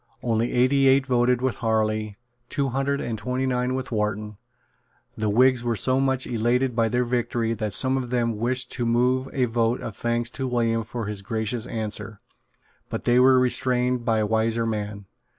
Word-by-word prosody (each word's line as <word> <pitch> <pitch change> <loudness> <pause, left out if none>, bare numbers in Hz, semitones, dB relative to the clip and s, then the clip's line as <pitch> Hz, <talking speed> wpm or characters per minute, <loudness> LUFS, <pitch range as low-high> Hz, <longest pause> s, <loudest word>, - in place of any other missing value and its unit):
Only 115 0 0
eighty 135 +2 +3
eight 135 +1 +4
voted 125 -1 +2
with 130 -6 0
Harley, 110 -2 -1 0.3
two 140 -2 -1
hundred 135 +2 -1
and 110 -2 -4
twenty 125 +4 -2
nine 125 0 0
with 130 -1 -5
Wharton. 105 -1 -2 0.8
The 110 -1 -1
Whigs 125 +3 +3
were 120 -1 0
so 130 +4 +2
much 135 -1 +1
elated 120 +2 0
by 115 -1 +2
their 125 +1 +1
victory 120 -1 -1
that 110 -1 -3
some 130 +9 +2
of 125 -2 -4
them 120 -3 0
wished 125 +3 0
to 120 - -2
move 125 +3 +1
a 130 -2 +1
vote 115 0 0
of 105 - -7
thanks 120 +2 -1
to 135 0 -4
William 115 -2 0
for 115 +1 -5
his 105 -1 -4
gracious 110 +3 -3
answer; 110 -2 -4 0.7
but - - -5
they 120 +1 +4
were 130 0 +6
restrained 125 -1 +1
by 110 -2 +1
wiser 110 +2 0
men. 105 -2 -4
120 Hz, 180 wpm, -24 LUFS, 110-125 Hz, 0.8 s, were